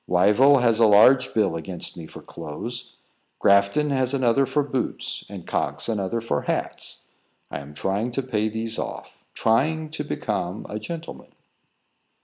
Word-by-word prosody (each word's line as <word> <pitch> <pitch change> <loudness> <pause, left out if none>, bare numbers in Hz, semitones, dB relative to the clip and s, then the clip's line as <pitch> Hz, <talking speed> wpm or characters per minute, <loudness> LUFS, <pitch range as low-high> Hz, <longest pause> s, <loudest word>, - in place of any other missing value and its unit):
Wyville 120 +10 +5
has 115 -2 +3
a 115 - +6
large 125 +5 +6
bill 105 -6 +1
against 85 +1 -5
me 85 -2 -8
for - - -12
clothes, 120 +11 -7 0.4
Grafton 100 +10 +3
another 130 -1 +2
for 145 +3 +1
boots, 135 -3 -3
and - - -8
Cox - - -1
another 110 0 -1
for 110 -11 -1
hats. - - -3 0.5
I - - -4
am 70 +1 -11
trying 100 +9 -1
to 135 - -1
pay 110 -4 -1
these 110 +1 -3
off - - -7
trying 155 +7 +1
to 155 -1 -4
become 105 -9 -3
a 105 - -5
gentleman." 165 +8 -8
115 Hz, 145 wpm, -24 LUFS, 100-135 Hz, 0.5 s, a